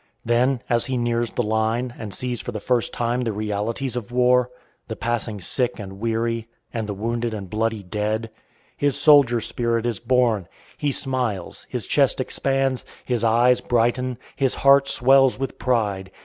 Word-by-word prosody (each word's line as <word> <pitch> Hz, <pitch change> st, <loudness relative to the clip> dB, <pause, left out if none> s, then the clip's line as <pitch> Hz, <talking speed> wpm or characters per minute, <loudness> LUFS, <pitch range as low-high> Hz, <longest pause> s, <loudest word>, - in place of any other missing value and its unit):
Then, 120 Hz, +2 st, +2 dB
as 120 Hz, -2 st, +1 dB
he 130 Hz, -1 st, -1 dB
nears 120 Hz, -1 st, 0 dB
the 120 Hz, -, -2 dB
line, 110 Hz, +3 st, 0 dB
and 110 Hz, -3 st, -7 dB
sees 125 Hz, +4 st, -3 dB
for -, -, -5 dB
the 105 Hz, -, -5 dB
first 120 Hz, +1 st, 0 dB
time 120 Hz, +1 st, -1 dB
the 115 Hz, -2 st, -1 dB
realities 110 Hz, +5 st, -3 dB
of 120 Hz, -1 st, -5 dB
war, 125 Hz, 0 st, +3 dB, 0.4 s
the -, -, -5 dB
passing 115 Hz, -3 st, -2 dB
sick 125 Hz, +7 st, -1 dB
and 95 Hz, -2 st, -8 dB
weary, 115 Hz, 0 st, -1 dB, 0.3 s
and 115 Hz, -3 st, -3 dB
the 100 Hz, -, -4 dB
wounded 115 Hz, +2 st, -2 dB
and 100 Hz, -2 st, -6 dB
bloody 110 Hz, +2 st, -1 dB
dead, 105 Hz, +4 st, -2 dB, 0.4 s
his 145 Hz, -1 st, 0 dB
soldier 145 Hz, -5 st, +6 dB
spirit 115 Hz, 0 st, -1 dB
is 120 Hz, -4 st, -1 dB
born; 120 Hz, -6 st, +1 dB, 0.3 s
he 145 Hz, -1 st, -1 dB
smiles, 125 Hz, -9 st, -2 dB
his -, -, -3 dB
chest -, -, +2 dB
expands, 135 Hz, -1 st, 0 dB, 0.2 s
his 120 Hz, -3 st, -1 dB
eyes 120 Hz, +2 st, +4 dB
brighten, 120 Hz, +1 st, 0 dB, 0.2 s
his 135 Hz, -2 st, +1 dB
heart 140 Hz, 0 st, +5 dB
swells 135 Hz, 0 st, +4 dB
with 135 Hz, -1 st, -5 dB
pride. 105 Hz, -6 st, 0 dB
120 Hz, 165 wpm, -23 LUFS, 110-125 Hz, 0.4 s, soldier